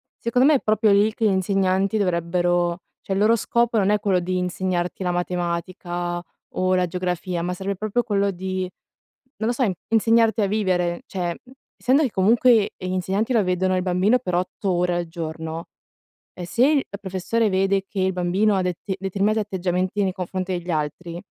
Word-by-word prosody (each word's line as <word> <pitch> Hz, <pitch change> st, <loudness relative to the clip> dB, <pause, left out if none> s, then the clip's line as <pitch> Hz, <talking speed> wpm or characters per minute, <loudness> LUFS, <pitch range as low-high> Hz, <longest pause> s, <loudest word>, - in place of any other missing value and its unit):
secondo 245 Hz, +2 st, +1 dB
me 305 Hz, -, +5 dB
è -, -, +3 dB
proprio 215 Hz, 0 st, +2 dB
lì 205 Hz, +2 st, +4 dB
che 225 Hz, -, 0 dB
gli 210 Hz, -, +5 dB
insegnanti 195 Hz, +2 st, +1 dB
dovrebbero 175 Hz, -1 st, 0 dB, 0.2 s
cioè 195 Hz, -, -3 dB
il 195 Hz, -, 0 dB
loro 220 Hz, +3 st, +5 dB
scopo 235 Hz, 0 st, +1 dB
non 195 Hz, -, +2 dB
è 210 Hz, 0 st, +3 dB
quello 195 Hz, -3 st, +1 dB
di 185 Hz, +1 st, -2 dB
insegnarti 180 Hz, 0 st, -2 dB
la 180 Hz, -, 0 dB
matematica 175 Hz, 0 st, -3 dB, 0.3 s
o 185 Hz, 0 st, 0 dB
la 180 Hz, -1 st, +2 dB
geografia, 180 Hz, 0 st, -3 dB
ma 180 Hz, +1 st, -2 dB
serve 195 Hz, +2 st, -3 dB
proprio 215 Hz, +5 st, -1 dB
quello 200 Hz, -3 st, +1 dB
di, 185 Hz, 0 st, -3 dB, 0.7 s
non 220 Hz, +2 st, -2 dB
lo -, -, +2 dB
so, 240 Hz, -4 st, +1 dB, 0.2 s
insegnarti 225 Hz, 0 st, +3 dB
a 205 Hz, -, +3 dB
vivere. 185 Hz, -4 st, 0 dB
Cioè, 175 Hz, -3 st, -3 dB
mhmm, 255 Hz, -, -17 dB, 0.2 s
essendo 265 Hz, +5 st, +3 dB
che 265 Hz, -, +1 dB
comunque 220 Hz, +2 st, +4 dB
gli 185 Hz, -, -6 dB
insegnanti 190 Hz, +6 st, -1 dB
lo 215 Hz, -, +3 dB
vedono 185 Hz, +1 st, +1 dB
il 185 Hz, -, 0 dB
bambino 185 Hz, +7 st, +2 dB
per 180 Hz, -8 st, -4 dB
8 185 Hz, +2 st, -2 dB
ore 175 Hz, 0 st, +1 dB
al 175 Hz, -1 st, -2 dB
giorno, 160 Hz, 0 st, -5 dB, 0.7 s
ehm, 180 Hz, -, -7 dB
se 235 Hz, +9 st, +2 dB
il 290 Hz, -3 st, +3 dB
la 200 Hz, -, -6 dB
professore 200 Hz, +3 st, -1 dB
vede 195 Hz, +1 st, +1 dB
che 195 Hz, -, -4 dB
il 190 Hz, 0 st, +2 dB
bambino 185 Hz, +4 st, +1 dB
ha 185 Hz, -, +1 dB
dete 180 Hz, +2 st, -3 dB
determinati 200 Hz, +3 st, 0 dB
atteggiamenti 185 Hz, -1 st, -1 dB
nei 190 Hz, -2 st, 0 dB
confronti 185 Hz, +1 st, -4 dB
degli 175 Hz, +1 st, -7 dB
altri, 165 Hz, +3 st, -3 dB
190 Hz, 190 wpm, -23 LUFS, 180-210 Hz, 0.7 s, me